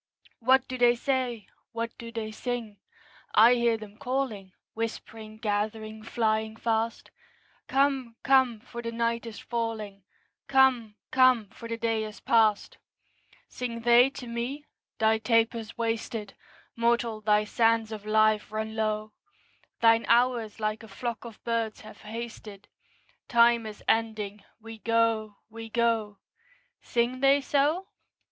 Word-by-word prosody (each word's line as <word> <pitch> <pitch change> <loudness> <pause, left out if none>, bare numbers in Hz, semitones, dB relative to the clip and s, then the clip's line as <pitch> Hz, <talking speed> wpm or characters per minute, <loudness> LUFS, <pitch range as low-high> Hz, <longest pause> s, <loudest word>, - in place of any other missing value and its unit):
What 260 +2 +3
do 255 0 -5
they 240 0 +5
say? 245 -3 -1 0.3
What 230 0 -4
do 230 -1 -8
they 225 -2 -4
sing? 230 -2 -4 0.6
I 230 +3 +8
hear 235 -2 +2
them 215 -1 -12
calling, 250 -8 -3 0.2
Whispering, 220 -1 -6
gathering, 215 0 -3
flying 220 -1 -1
fast, 225 0 -2 0.6
'Come, 270 -4 +1
come, 260 -5 +3
for 235 0 -8
the 230 0 -4
night 230 0 -1
is 225 - -8
falling; 220 -4 -4 0.5
Come, 260 -5 +3 0.2
come, 255 -5 +4
for 230 - -10
the 230 - -3
day 225 -1 0
is 215 -1 -8
past!' 220 -3 +2 0.7
Sing 235 -2 -5
they 240 +2 +6
to 270 -2 -9
me? 240 +5 -4 0.3
'Thy 220 0 +3
taper's 230 0 0
wasted; 225 -2 -3 0.4
Mortal, 235 -1 +1
thy 210 0 +3
sands 225 0 +2
of 215 -2 -6
life 215 0 +2
run 220 0 -4
low; 215 -1 -2 0.7
Thine 230 0 +5
hours 235 -2 +2
like 215 0 -2
a 225 - -11
flock 235 +3 -5
of 230 -2 -11
birds 230 -2 -2
have 215 - -13
hasted: 215 -2 -8 0.6
Time 235 -1 +4
is 210 -1 -10
ending; 215 -3 0 0.2
we 225 0 -10
go, 225 -2 +1
we 225 0 -9
go.' 225 -3 0 0.6
Sing 240 +2 -1
they 275 +1 +5
so? 295 +7 0
230 Hz, 135 wpm, -28 LUFS, 215-235 Hz, 0.7 s, I